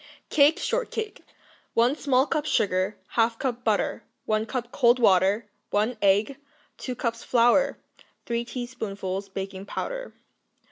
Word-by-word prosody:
Cake 295 +2 +5
Shortcake 450 -3 -3 0.5
1 240 +4 +4
small 270 -3 +2
cup 305 -1 -1
sugar. 190 -2 +1 0.2
1/2 230 0 +2
cup 250 -1 -3
butter. 215 -3 0 0.2
1 215 +1 0
cup 245 0 -4
cold 240 -3 +4
water. 200 -1 +3 0.2
1 215 +4 +1
egg. 205 +7 +3 0.4
2 255 - -4
cups 230 -1 -3
flour. 245 +4 +3 0.5
3 235 0 -1
teaspoonfuls 205 -6 -5
baking 195 0 -6
powder. - - -5
235 Hz, 125 wpm, -26 LUFS, 205-260 Hz, 0.5 s, Cake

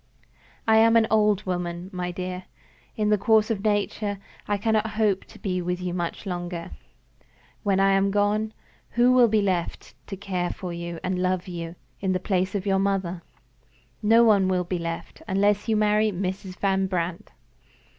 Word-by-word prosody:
I 220 0 +6
am 225 +1 +5
an 225 -1 +5
old 210 -2 +3
woman, 175 0 -3
my 180 -1 -3
dear. 185 +1 -5 0.5
In 210 -1 0
the 210 -1 +3
course 220 +1 +3
of 205 -3 -2
nature, 205 -1 0 0.3
I 205 - +1
cannot 220 +1 +1
hope 205 -4 +1
to - - -15
be 185 -2 -2
with 180 0 -2
you 180 -1 -3
much 175 +3 -4
longer. 175 -2 -5 0.9
When 195 -3 +1
I 195 0 +4
am 195 0 +3
gone, 205 +2 +1 0.5
who 245 +1 +5
will 250 -1 +6
be 215 -2 +2
left 180 -4 -2
to 195 - -6
care 185 -3 -2
for 180 -2 -6
you 170 -1 -5
and 185 -1 -1
love 185 0 0
you, 170 -1 -6 0.2
in 190 -1 0
the 185 - 0
place 185 +1 -1
of 195 -1 -2
your 195 -1 +2
mother? 190 -3 -1 0.8
No 225 +2 +5
one 205 -4 +4
will 185 -1 +1
be 180 0 -3
left, 165 0 -6
unless 205 +3 +1
you 220 - +3
marry 210 0 +3
Mrs. 185 0 -4
Van 195 -1 +1
Brandt. 175 -2 -3
195 Hz, 175 wpm, -25 LUFS, 180-210 Hz, 0.9 s, I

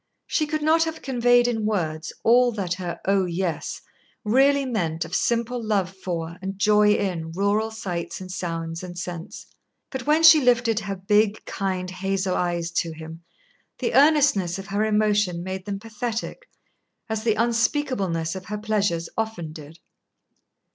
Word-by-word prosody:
She 305 - 0
could 310 0 -2
not 325 +2 +4
have 320 0 -6
conveyed 245 -2 +3
in 225 -3 -1
words 165 -7 -2
all 245 +2 +5
that 190 -5 -2
her 180 -2 -5
"Oh, 195 0 +2
yes!" 175 -1 -3 0.4
really 275 +5 +4
meant 170 -10 -1
of - - -11
simple 235 +2 0
love 195 -4 0
for 170 -3 -4
and 190 0 -5
joy 210 +1 +4
in 165 -5 -2
rural 200 +4 +1
sights 175 -6 -5
and 185 -1 -8
sounds 165 -2 -4
and 175 -1 -8
scents. 175 -1 -6 0.5
But 265 -1 -5
when 310 +2 +3
she 320 -2 +9
lifted 240 -3 +3
her 200 -1 -4
big 210 +3 +1
kind 185 -2 -3
hazel 190 0 -1
eyes 170 -1 -1
to 165 - -6
him, 160 +1 -10 0.6
the - - -2
earnestness 280 - +4
of 195 - -7
her 205 +2 0
emotion 210 -5 +1
made 190 0 -5
them 200 -1 -3
pathetic, 225 - -5 0.6
as 220 -1 -3
the 225 -2 +2
unspeakableness 230 - 0
of 190 0 -7
her 210 +3 -4
pleasures 205 -6 0
often 195 -8 -3
did. 155 0 -11
200 Hz, 155 wpm, -24 LUFS, 175-230 Hz, 0.6 s, she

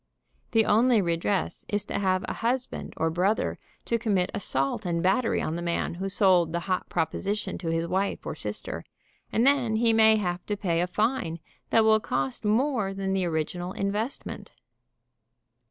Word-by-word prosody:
The 225 -1 +3
only 230 +2 +4
redress 175 +1 -1
is 205 -1 -1
to - - -3
have 185 -1 +1
a - - -2
husband 245 +2 -2
or 160 +1 +1
brother 185 +6 0 0.3
to 235 - 0
commit 200 -5 +1
assault 135 0 -1
and 170 -2 -1
battery 195 +6 +2
on 155 - -2
the 170 - -3
man 170 0 -1
who 190 +3 -4
sold 185 -4 +3
the 170 - -1
hot 185 +1 -2
proposition 190 +5 -2
to 165 -2 -3
his 165 0 0
wife 190 +3 -1
or - - -3
sister, - - -5 0.5
and 230 - +2
then 265 -5 +3
he 225 0 +3
may 220 0 +6
have 180 -4 -2
to 205 - -1
pay 170 -4 0
a 180 - 0
fine 210 -3 -1 0.3
that 225 - +4
will 220 0 +5
cost 135 - -2
more 220 -2 +1
than 195 0 -2
the 190 -1 +1
original 175 +2 -2
investment. 210 +6 -3
195 Hz, 170 wpm, -27 LUFS, 175-220 Hz, 0.5 s, may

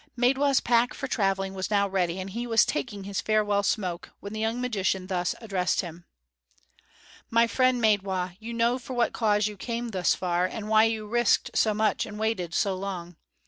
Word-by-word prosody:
Maidwa's 270 +3 +3
pack 240 0 +2
for 270 - -4
traveling 195 -5 0
was 190 -1 -3
now 200 -1 +2
ready, 185 -2 -1
and 190 +1 -5
he 235 +4 -4
was 225 -1 +4
taking 210 -9 -3
his 195 0 -3
farewell 210 -2 +2
smoke, 180 -4 -2
when 200 - -8
the 215 - -4
young 225 +2 -1
magician 195 -6 -1
thus 180 -2 -1
addressed 195 -5 0
him: 170 -1 -9 1.2
"My 230 0 +4
friend 255 +1 +2
Maidwa, 190 -5 +1
you 225 +1 -7
know 235 +2 +1
for 255 +1 -7
what 240 - +1
cause 210 -2 +2
you 210 -1 -3
came 235 +3 -4
thus 185 -5 +1
far, 180 0 0
and 210 +2 -6
why 220 0 +6
you 225 -1 -1
have 210 - -11
risked 240 0 +2
so 215 -2 +2
much 215 -1 +1
and 210 - -8
waited 215 -6 -2
so 195 - +1
long. 185 -3 -6
210 Hz, 195 wpm, -27 LUFS, 190-230 Hz, 1.2 s, why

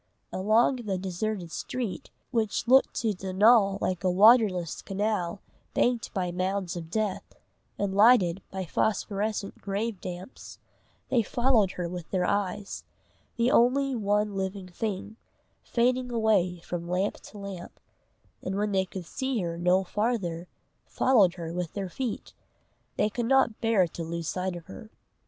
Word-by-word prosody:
Along 220 +7 +3
the 210 -6 -3
deserted 185 -1 -3
street, 250 +2 -4 0.2
which 225 -1 -1
looked 265 +2 +5
to 225 -2 +1
Donal 195 +2 +4
like 185 0 -1
a 185 - +3
waterless 195 -3 +4
canal 195 -2 -2 0.3
banked 240 -2 +1
by 180 -3 -2
mounds 185 0 -2
of 165 -2 -6
death, 210 +1 -3 0.4
and 200 -1 -1
lighted 200 -4 +5
by 190 -1 -4
phosphorescent 205 +2 -1
grave 205 +1 -3
damps, 180 +5 -8 0.5
they 245 - +3
followed 235 -3 +2
her 175 -1 -3
with 175 -1 -7
their 185 -2 0
eyes, 200 +1 -2 0.5
the 235 +2 +2
one 230 -5 +2
living 190 0 -3
thing, 210 +3 -4 0.4
fading 250 +1 0
away 200 -7 +1
from 170 0 -5
lamp 185 +3 0
to 210 - -13
lamp; 195 -3 -8 0.6
and 185 - -3
when 205 +1 0
they 190 -1 +2
could 185 -1 -7
see 260 +4 -2
her 170 -1 -3
no 180 +2 +2
farther, 185 -5 -2 0.4
followed 210 -9 +3
her 165 -2 -6
with 175 -2 -3
their 195 -2 -4
feet; 240 +5 -4 0.6
they - - +3
could 230 +2 -3
not 265 -4 +3
bear 225 -5 +3
to 165 - -6
lose 165 0 -4
sight 185 +1 -2
of 170 -1 -9
her. 205 +4 -11
200 Hz, 145 wpm, -28 LUFS, 180-225 Hz, 0.6 s, looked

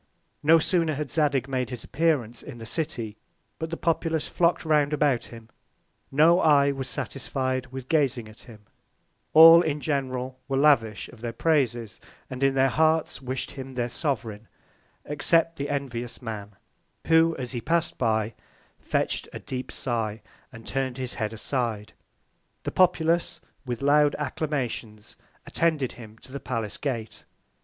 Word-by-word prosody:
No 160 +2 +6
sooner 165 -2 +1
had 145 -2 -4
Zadig 140 -4 +1
made 130 -2 -2
his 125 -2 -6
Appearance 135 -8 0
in 140 -5 -9
the 115 - -9
City, 115 -6 -3 0.4
but 160 0 -3
the 165 - -4
Populace 165 -1 0
flock'd 170 0 +1
round 150 -2 +2
about 145 -5 +2
him: 115 -1 -12 0.6
No 160 +5 +5
Eye 145 -4 +5
was 135 -1 -5
satisfied 130 -1 -3
with 130 0 -8
gazing 135 -7 +1
at 110 +1 -14
him: 110 -4 -14 0.7
All 165 +2 +10
in 150 -3 -1
general 130 -3 -2
were 135 -1 -1
lavish 135 -8 +3
of 115 - -15
their 120 -1 -3
Praises, 120 - 0 0.3
and 130 0 -6
in 135 0 +3
their 135 0 +4
Hearts 160 +1 +1
wish'd 130 0 -4
him 135 -1 -8
their 120 -1 -1
Sovereign, 115 -7 -3 0.6
except 165 +3 +2
the 140 +1 -3
envious 125 -4 -4
Man, 105 -4 -7 0.5
who 165 0 +4
as 125 -2 -5
he 120 -3 -4
pass'd 170 +3 0
by, 110 -2 +1 0.5
fetch'd - - -2
a - - -6
deep 130 0 -6
Sigh, 110 -4 -2 0.3
and 115 -3 -12
turn'd 135 -2 -2
his 130 -2 -4
Head 110 -2 -3
aside. 115 -2 -3 0.7
The - - -3
Populace 175 -2 +2 0.3
with 120 +1 -4
loud 145 +1 +4
Acclamations 130 -7 -4 0.3
attended 155 -6 0
him 110 -2 -12
to 130 - -12
the 140 - -5
Palace 115 -8 -4
Gate. 115 -6 -4
135 Hz, 150 wpm, -26 LUFS, 120-150 Hz, 0.7 s, All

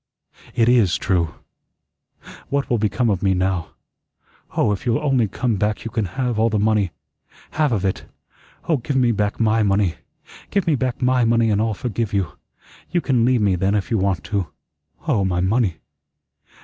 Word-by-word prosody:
It 115 - +3
IS 110 -7 +4
true. 85 -5 0 1.1
What 140 -2 -1
will 120 - +2
become 110 +2 +1
of 95 -2 -1
me 95 -1 +2
now? 90 -2 0 0.9
Oh, - - +3
if 100 - -3
you'll 120 -2 +1
only 135 -6 +1
come 115 +2 -1
back 105 +3 -1
you 115 - -4
can 115 -3 -1
have 125 -4 0
all 115 +1 +3
the 110 - 0
money 105 -2 +2 0.6
half 150 -3 +1
of 100 -4 0
it. 95 - -2 0.6
Oh, 160 - +3
give 135 +3 -4
me 125 -3 +3
back 105 -1 -1
my 115 0 +3
money. 100 -3 +1 0.5
Give 200 -3 0
me 165 - +2
back 130 -2 -1
my 125 0 +3
money, 115 -1 +3
and 105 0 +2
I'll 110 -1 0
forgive 115 -1 -3
you. 95 -5 0 0.6
You 175 - +1
can 125 -7 +1
leave 125 -2 +3
me 100 -2 +3
then 95 +3 +1
if 100 +2 -2
you 110 - +2
want 95 -2 0
to. 100 -5 -2 0.6
Oh, 115 -10 +2
my 90 -2 0
money. 95 -1 +1
110 Hz, 185 wpm, -21 LUFS, 100-125 Hz, 1.1 s, IS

